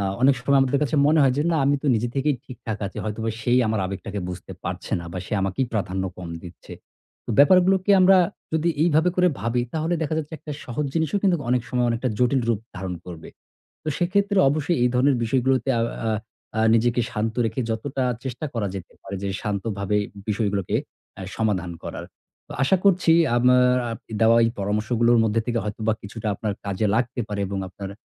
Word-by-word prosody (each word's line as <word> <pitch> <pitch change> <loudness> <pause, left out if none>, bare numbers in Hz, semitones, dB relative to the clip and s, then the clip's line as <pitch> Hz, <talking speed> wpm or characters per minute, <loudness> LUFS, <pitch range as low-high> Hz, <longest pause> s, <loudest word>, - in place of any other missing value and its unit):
আ - - -1 0.2
অনেক 135 0 +6
সময় 140 +2 +3
আমাদের 135 +1 +2
কাছে 150 +1 0
মনে 155 +2 +4
হয় 135 - +4
যে, 145 - +2
"না - - +2
আমি 140 +1 +3
তো 150 - -3
নিজে 115 +2 0
থেকেই 140 0 +1
ঠিকঠাক 115 -4 -6
আছি। 95 - -9
হয়তোবা 110 +1 -2
সেই 120 +2 +3
আমার 110 -1 0
আবেগটাকে 100 +1 -5
বুঝতে 90 0 -7
পারছে - - -5
না। - - -8
বা 95 - -4
সে - - -9
আমাকেই 95 +7 -1
প্রাধান্য 95 -2 -1
কম 90 -2 -7
দিচ্ছে।" 90 -1 -12 0.5
তো - - -6
ব্যাপারগুলোকে 185 +6 +5
আমরা 190 +1 +7 0.3
যদি 160 +1 +1
এইভাবে 160 +1 +3
করে 180 0 +4
ভাবি, 115 +3 0
তাহলে 160 +2 0
দেখা 155 0 -1
যাচ্ছে 155 0 -5
একটা 150 - -7
সহজ 140 +4 -3
জিনিসও 165 +5 +1
কিন্তু 180 -5 +2
অনেক 125 -1 +2
সময় 125 -1 +1
অনেকটা 115 +2 -1
জটিল 125 +2 +3
রূপ 110 -3 +1 0.2
ধারণ 95 -1 -4
করবে। 85 -3 -9 0.5
তো - - -4
সেক্ষেত্রে 200 +3 +1
অবশ্যই 155 +4 0
এই - - +4
ধরনের 130 +2 +3
বিষয়গুলোতে 130 +1 +1
আও 115 - +2 0.2
আ - - +1 0.5
আ - - +3
নিজেকে 120 +1 +2
শান্ত 110 0 -2
রেখে 110 +3 -3
যতটা 130 +4 -2 0.2
চেষ্টা 130 +4 -4
করা 110 -3 -1
যেতে 90 -2 -8
পারে 100 - -6
যে 100 - -2
শান্তভাবে 100 -1 -2 0.3
বিষয়গুলোকে 100 -3 0 0.4
অ্যা 95 - -9
সমাধান 100 -6 0
করার। - - -6 0.4
তো - - -8
আশা 165 +8 +4
করছি 185 -4 +4 0.2
আমার 125 +1 +5 0.2
আপ 115 - -5 0.2
দেওয়া 115 +1 +5
এই 115 - +2
পরামর্শগুলোর 110 +4 +2
মধ্যে 110 +1 +1
থেকে 120 -1 0
হয়তোবা 110 +1 -1
কিছুটা 110 +1 -7
আপনার 105 0 -3
কাজে 100 +2 -1
লাগতে 120 +2 0
পারে 105 -1 -3
এবং 100 - -3
আপনার 95 +1 -8
120 Hz, 195 wpm, -23 LUFS, 105-145 Hz, 0.5 s, আমরা